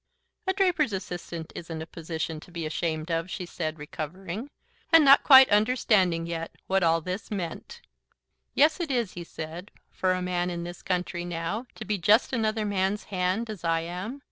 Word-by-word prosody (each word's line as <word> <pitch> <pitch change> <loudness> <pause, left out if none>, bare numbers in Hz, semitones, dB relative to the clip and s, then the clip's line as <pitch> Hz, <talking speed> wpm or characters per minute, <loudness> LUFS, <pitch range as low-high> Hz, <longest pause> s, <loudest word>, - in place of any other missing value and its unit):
"A 380 - +3
draper's 360 - +2
assistant 175 -3 -5
isn't 165 -1 -6
a - - -8
position 160 -1 -5
to 160 - -15
be 170 -2 -4
ashamed 155 +1 -2
of," 165 +2 -1
she 180 - -4
said, 160 -2 -4
recovering, 180 - -6 0.4
and 325 -2 +8
not 275 0 +8
quite 265 -2 +9
understanding 205 -6 +3
yet 165 -1 -5
what 190 0 +2 0.3
this 185 +4 -4
all 205 - -1
meant. 195 - -6 0.7
"Yes, 310 +4 +4
it 340 -3 -2
is," 240 -7 0
he 175 - -6
said, 165 +3 -8 0.2
"for 185 -1 +1
a 185 - -1
man, 180 0 -1
in 170 -1 -4
this 175 0 -8
country 180 -1 -2
now. 175 +7 -3
To 220 - -7
be 205 0 -1
just 215 +9 +4
another 220 -2 0
man's 200 0 0
hand, 185 +5 0
as 215 -5 -7
I 165 -1 +1
am. 180 +10 -5
180 Hz, 180 wpm, -27 LUFS, 165-220 Hz, 0.7 s, quite